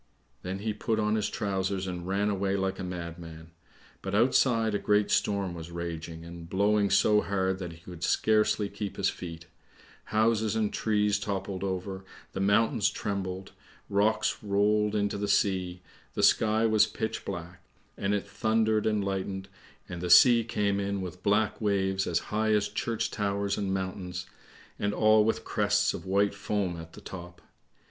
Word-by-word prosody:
Then 95 +1 -4
he 105 +2 -2
put 110 +1 -1
on 105 0 +1
his 110 -2 0
trousers 95 -1 -2
and 90 -1 -5
ran 100 +2 +1
away 100 0 0
like 95 0 -1
a - - -4
madman. 85 -2 -7 0.5
But 95 +1 -3
outside 115 -1 +3
a 100 - 0
great 105 0 +2
storm 100 -3 +1
was 85 -1 -8
raging, 85 -1 -6
and 85 -1 -10
blowing 100 +1 +2
so 105 +2 +4
hard 95 -1 -1
that 90 -3 -5
he - - -13
could 90 -1 -10
scarcely 105 -1 +2
keep 100 -1 -6
his - - +1
feet; 85 -2 -8 0.6
houses 110 0 +1
and 110 -2 0
trees 105 -1 +1
toppled 100 -2 -3
over, 95 0 -3 0.3
the - - -4
mountains 105 +2 +3
trembled, 95 -2 -4 0.4
rocks 110 +2 +2
rolled 105 +1 +2
into 100 -1 0
the 105 - -1
sea, 90 -3 +1 0.3
the - - 0
sky 110 +1 +4
was 110 -1 +4
pitch 110 0 -4
black, 90 -1 -7 0.3
and 100 +1 0
it 100 0 -3
thundered 110 0 +1
and 105 -2 +1
lightened, 95 0 -3 0.4
and 90 -1 -6
the 90 - -3
sea 115 +6 +8
came 100 -3 0
in 100 0 -2
with 90 0 -7
black 105 +3 +1
waves 95 -2 +1
as 85 - +1 0.2
high 110 0 +2
as 105 -1 +2
church 115 +2 -2
towers 100 -1 -1
and 100 -2 -2
mountains, 95 -1 -4 0.5
and 100 0 -1
all 110 0 +5
with 115 +1 -1
crests 105 0 +1
of - - -7
white 100 +2 +2
foam 100 -3 -2
at 80 0 -10
the - - -12
top. 90 -1 -9
100 Hz, 170 wpm, -28 LUFS, 95-105 Hz, 0.6 s, sea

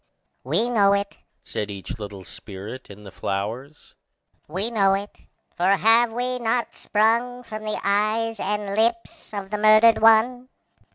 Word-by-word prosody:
"We 235 - 0
know 205 -5 +3
it," 200 0 -2 0.2
said 105 - -5
each 100 +3 -7
little 100 -2 -8
spirit 105 +7 -10
in 100 +1 -12
the 100 - -11
flowers, 110 +11 -5 0.5
"we 195 +9 -3
know 195 -4 +3
it, 200 +1 -6 0.4
for 185 +3 +3
have 225 +2 +4
we 250 +2 -3
not 235 0 -1
sprung 235 +4 0
from 215 -2 -8
the 215 - -3
eyes 215 +2 0
and 205 -1 -2
lips 230 +1 -1
of 200 -2 -6
the 210 - -2
murdered 215 +1 +6
one. 240 +3 +4
210 Hz, 150 wpm, -23 LUFS, 175-230 Hz, 0.5 s, murdered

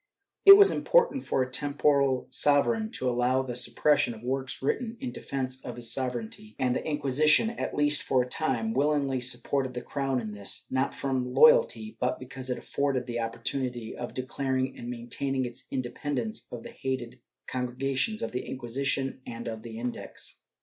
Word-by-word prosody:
It 395 0 +13
was 405 -1 +8
impossible 475 - +3
for 130 - 0
a 130 - -7
temporal 140 -1 +2
sovereign 150 - +3
to 130 - -2
allow 125 +2 +2
the 125 -2 -5
suppression 140 +1 +2
of 110 - -13
works 130 +1 -3
written 230 - -1
in 255 -2 -4
defence 130 - -4
of 125 - -6
his 120 -1 -2
sover 130 -2 -1
eignty, 110 0 -12
and 125 -1 +1
the - - -2
Inquisition, 150 - +3
at - - -4
least 145 0 +2
for 130 -2 +2
a - - -8
time, 125 -6 -1
willingly 140 -1 +1
supported 130 +1 -1
the 125 - -4
crown 135 -2 -1
in 110 -3 -5
this, 100 -1 -3
not 130 +1 0
from 130 -2 -2
loyalty, 470 - +5
but 125 0 0
because 130 0 -8
it 125 - -1
afforded 140 -3 -1
the 120 -1 -3
opportunity 115 +1 -3
of 120 - -6
declaring 130 0 -2
and 120 - -7
maintaining 130 +2 -2
its 120 +2 -7
independence 130 -2 -3
of 120 -2 -7
the - - -9
hated 130 -3 -4 0.3
Congregations 135 - -2
of 115 - -3
the 125 - -3
Inquisition 135 +2 -2
and 115 0 -6
of 110 -1 -5
the 110 0 -8
Index. 120 +1 -5
130 Hz, 175 wpm, -28 LUFS, 125-140 Hz, 0.3 s, It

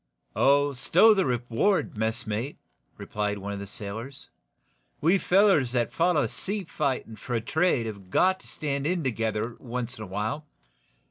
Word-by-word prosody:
"Oh, 140 +1 +4
stow 185 - +5
the 190 -6 +1
reward, 125 - 0
messmate," 110 +3 -2 0.4
replied 105 -1 -3
one 100 +1 -5
of 100 - -5
the 100 - -7
sailors. 115 +8 -6 0.7
"We 175 +6 +3
fellers 180 - +4
that 120 -2 0
foller 165 -5 +2
seafighting 140 - -3
for 125 +2 -4
a 115 - 0
trade 155 0 +1
have 100 -4 -7
got 185 - +3
to - - -15
stand 140 -1 -3
in 175 -1 0
together 115 -2 -2
once 120 -1 -5
in - - -5
a - - -7
while. 110 +11 -3
125 Hz, 150 wpm, -27 LUFS, 110-155 Hz, 0.7 s, stow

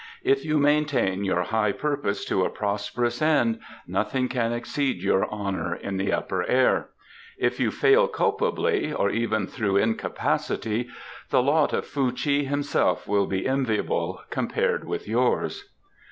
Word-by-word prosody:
"If 405 +1 +2
you 155 0 +1
maintain 145 -9 +2
your 95 -2 +1
high 105 +1 +1
purpose 140 -8 -2
to 95 - +1
a - - +1
prosperous 105 +4 -2
end 145 -8 +2 0.3
nothing 130 -1 -1
can 120 -2 0
exceed 130 +4 -2
your 95 - +2
honour 95 -5 -3
in 95 +1 -5
the 95 +1 0
Upper 95 -2 -1
Air; 130 0 +2 0.5
if - - 0
you - - +2
fail 465 +4 +4
culpably, 430 -5 0
or 100 - +1
even 110 -2 0
through 100 -5 -1
incapacity, 110 +1 -1 0.4
the 125 - +3
lot 145 +2 +3
of - - -1
Fuh 135 -3 0
chi 140 +2 +1
himself 145 +1 0
will 100 -1 +2
be 95 -1 -2
enviable 130 -5 -1
compared - - 0
with - - -4
yours." 120 +3 0
120 Hz, 145 wpm, -25 LUFS, 100-145 Hz, 0.5 s, fail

